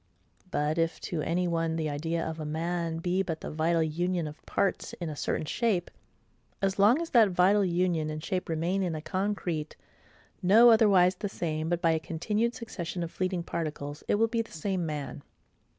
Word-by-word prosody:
But 150 -1 0
if 165 0 0
to 165 -3 -3
any 175 +3 0
one 165 -1 0
the 160 -1 -1
idea 160 +3 -2
of 160 0 -5
a - - -3
man 165 +2 -2
be 175 +3 0
but 165 -4 -4
the - - -5
vital 160 +2 +1
union 170 +1 -1
of 150 0 -10
parts 200 - -1
in 170 -3 -5
a - - -6
certain 150 - -2
shape; 200 0 0 0.7
as 195 0 0
long 215 +9 +6
as 335 -1 -4
that 230 -5 +6
vital 190 +3 +4
union 175 -3 +1
and 155 0 -5
shape 185 -3 -2
remain 170 +4 0
in 175 -4 -1
a 155 - -4
concrete, 185 -5 -2 0.7
no 220 +6 +7
otherwise 195 -5 +5
the 205 - -3
same 160 -3 -3
but 175 -1 -1
by 165 - +5
a 160 - +1
continued 210 +9 -1
succession 180 -6 -5
of 170 - -5
fleeting 185 -2 -2
particles, 150 -3 -4
it - - +3
will 225 +2 +4
be 230 0 0
the 225 - -10
SAME 175 +1 -2
MAN. 145 -2 -5
170 Hz, 195 wpm, -29 LUFS, 160-195 Hz, 0.7 s, no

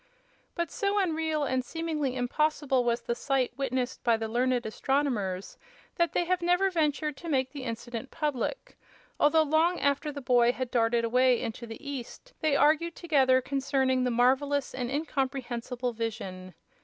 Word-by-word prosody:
But 340 -3 -2
so 400 0 0
unreal 320 -5 0
and 260 -2 0
seemingly 305 -2 -2
impossible 270 +1 +1
was 235 0 0
the 235 - -2
sight 260 0 0
witnessed 260 -1 -2
by 235 -2 +3
the 225 0 -3
learned 245 +2 0
astronomers 220 -6 -1 0.4
that 340 -2 +1
they 350 - +1
have 365 0 0
never 360 +3 +2
ventured 305 -3 0
to 340 - -7
make 260 -3 +1
the 275 -2 -7
incident 235 +1 -5
public, 300 - -3 0.4
although 315 +2 +5
long 320 +4 +2
after 285 +2 0
the 285 - -6
boy 245 -2 +3
had 255 -1 -4
darted 230 -1 +2
away 250 +1 +3
into 230 +1 -5
the 225 +6 -9
east 280 - -7
they 310 -3 +2
argued 310 +4 +3
together 265 -6 +3
concerning 265 -1 0
the 250 - +1
marvelous 265 +4 +2
and 250 -2 -3
incomprehensible 260 -4 -2
vision. 190 -5 -5
265 Hz, 155 wpm, -28 LUFS, 245-300 Hz, 0.4 s, although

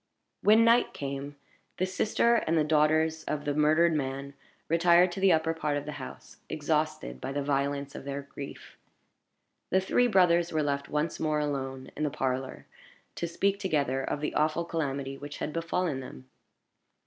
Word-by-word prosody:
When 220 +2 +6
night 235 +1 +4
came, 140 +1 -5 0.4
the 185 - +1
sister 215 +5 +2
and 165 -6 0
the 155 - +4
daughters 155 +1 +2
of 150 -1 -3
the 145 - 0
murdered 155 +3 +4
man 140 -1 -3 0.3
retired 170 +2 +5
to 175 - -5
the 190 -1 +5
upper 160 0 +2
part 150 -2 -1
of 145 - -5
the 150 - -5
house, 130 - -10
exhausted 155 - -1
by - - -4
the 140 0 -2
violence 140 0 -1
of - - -8
their 140 0 -4
grief. 140 0 -10 0.9
The 190 - +3
three 245 +6 +2
brothers 175 -5 +3
were 155 -1 +1
left 140 -1 -2
once 150 +2 -1
more 155 -1 0
alone 135 -3 -3
in - - -6
the 150 - +1
parlor, 130 -1 -3 0.5
to 170 - -3
speak 195 +4 0
together 140 -8 0
of 145 - -3
the 150 - -2
awful 155 +2 +1
calamity 140 -4 -3
which 145 0 -7
had 150 - -4
befallen 165 -3 -1
them. 65 - -10
150 Hz, 170 wpm, -29 LUFS, 140-170 Hz, 0.9 s, When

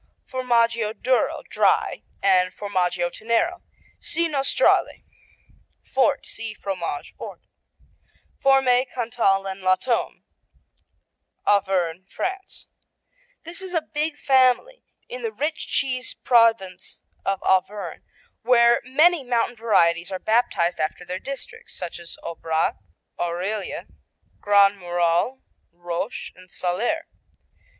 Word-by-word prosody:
Formaggio 230 -3 +1
Duro 255 +1 +1
(Dry) - - +2 0.2
and 185 -2 +4
Formaggio 180 -3 -1
Tenero 235 - 0 0.4
see 335 +1 0
Nostrale. 285 - +2 0.8
Fort - - +1
see 225 -1 -6
Fromage 185 -8 -4
Fort. - - -9 1.0
Fourme, 265 -2 +4
Cantal, 225 -5 +1
and 195 0 -5
la 185 0 +4
Tome 240 +3 -2 1.2
Auvergne, 190 -3 +1
France 380 +1 -5 0.8
This 335 +3 -7
is 370 -1 -6
a 330 - +2
big 300 0 -1
family 265 - +2 0.2
in 250 +1 -7
the 225 -2 -2
rich 295 +8 -3
cheese 255 -2 -1
province 225 -7 +2 0.2
of 195 -1 0
Auvergne, 190 +2 0 0.4
where 235 0 +5
many 305 +5 +3
mountain 240 -1 0
varieties 175 -6 +2
are 190 - -2
baptized 200 -5 +1
after 155 +3 -2
their 180 +1 -4
districts, 455 - -8
such 175 -1 -6
as 170 -1 -11
Aubrac, 160 -1 -1 0.4
Aurilla, 185 +4 -3 0.5
Grand 200 -1 +4
Murol, 175 +8 0 0.3
Rôche 175 +5 -5
and 185 0 -17
Salers. 225 - -1
220 Hz, 105 wpm, -23 LUFS, 185-255 Hz, 1.2 s, where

